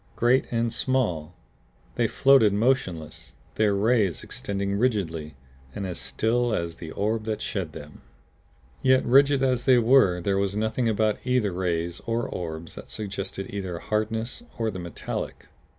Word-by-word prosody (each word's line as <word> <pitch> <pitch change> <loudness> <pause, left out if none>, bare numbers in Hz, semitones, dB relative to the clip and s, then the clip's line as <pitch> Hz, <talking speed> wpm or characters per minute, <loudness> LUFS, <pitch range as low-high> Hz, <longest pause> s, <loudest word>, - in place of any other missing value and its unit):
Great 120 +3 +3
and 115 0 0
small, 90 - 0 0.6
they - - +1
floated 135 -7 +5
motionless, 100 - -1 0.2
their 105 -2 +2
rays 105 -4 +2
extending 100 0 -3
rigidly 85 - -1 0.4
and 100 - -3
as 90 -2 -5
still 110 - 0
as 85 -1 -3
the 80 - -8
orb 110 +2 -1
that 110 -1 -2
shed 95 -7 -4
them. 75 0 -11 0.8
Yet 130 0 +4
rigid 140 +2 +5
as 125 -2 +1
they 130 -2 +6
were 115 -7 +5
there 95 +2 0
was 100 0 -1
nothing 110 +3 0
about 110 -1 +1
either 125 -5 +1
rays 85 -1 -2
or 115 +1 0
orbs 80 -1 -6
that - - -10
suggested 100 -2 -5
either 95 -4 -4
hardness 110 - -2 0.2
or 115 -1 0
the 95 - -6
metallic. 85 -2 -5
105 Hz, 150 wpm, -26 LUFS, 90-120 Hz, 0.8 s, they